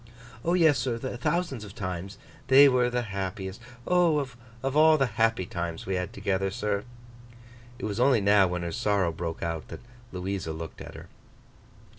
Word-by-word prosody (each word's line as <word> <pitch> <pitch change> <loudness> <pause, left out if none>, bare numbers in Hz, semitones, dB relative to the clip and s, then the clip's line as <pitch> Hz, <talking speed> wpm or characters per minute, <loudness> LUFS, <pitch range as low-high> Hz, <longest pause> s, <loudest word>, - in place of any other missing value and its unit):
'O, 170 +2 +2
yes, 160 -7 +4
sir, 120 -1 -1
thousands 130 +2 -2
of 105 -1 -11
times. 95 0 -5 0.3
They 140 +2 +8
were 125 -2 +3
the 125 0 -1
happiest—O, 115 - -1
of 125 -1 -5
all 155 +1 +6
the 135 - +3
happy 115 -3 +1
times 85 -1 -5
we 95 - -2
had 90 +2 -2
together, 95 -4 -1
sir!' 105 -1 -2 0.9
It 125 - -5
was 105 +1 -3
only 125 -1 +4
now 100 -1 +5
when 90 0 -3
her 85 - -3
sorrow 100 -1 +1
broke 80 0 -5
out, 85 -1 -3
that - - -9 0.3
Louisa 90 -3 -3
looked 80 0 -8
at - - -9
her. - - -10
105 Hz, 165 wpm, -27 LUFS, 95-125 Hz, 0.9 s, They